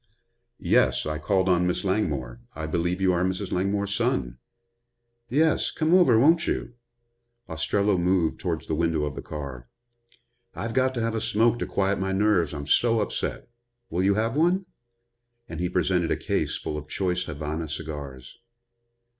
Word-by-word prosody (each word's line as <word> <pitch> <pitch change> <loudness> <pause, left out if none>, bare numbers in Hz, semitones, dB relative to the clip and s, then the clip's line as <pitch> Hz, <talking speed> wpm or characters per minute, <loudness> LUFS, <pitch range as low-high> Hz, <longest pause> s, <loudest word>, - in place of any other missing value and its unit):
"Yes, - - +2
I 75 0 -3
called 95 +4 +1
on 90 -1 +3
Miss 90 - -1
Langmore. 75 - -1
I 80 +1 -4
believe 85 +3 -1
you 95 -1 +3
are 90 0 +1
Mrs. 95 +1 -2
Langmore's 100 +2 0
son." - - -1 0.9
"Yes. 155 +5 +2
Come 160 +1 0
over, 175 -11 +6
won't 160 +7 +4
you?" - - -2 0.7
Ostrello 100 +4 +1
moved 90 -2 +1
towards 85 -4 -3
the - - -3
window 80 -1 +1
of 75 -2 -2
the - - -6
car. 65 -5 -7 0.9
"I've 115 0 -4
got 130 +1 +1
to 120 - -1
have 115 0 -1
a 110 - -2
smoke 115 +1 +2
to - - -2
quiet 100 0 0
my 95 0 -1
nerves, 95 -6 +2
I'm 70 -1 -5
so 115 +10 +3
upset. 105 - -3 0.4
Will 90 - 0
you 100 +1 +3
have 115 +4 0
one?" 175 +5 +2 0.8
And 85 - -7
he 90 0 -1
presented 90 -3 +1
a - - +1
case - - -1
full 75 - -4
of 75 - -12
choice 90 0 -1
Havana 80 +1 -4
cigars. 70 -5 -7
90 Hz, 165 wpm, -25 LUFS, 80-110 Hz, 0.9 s, over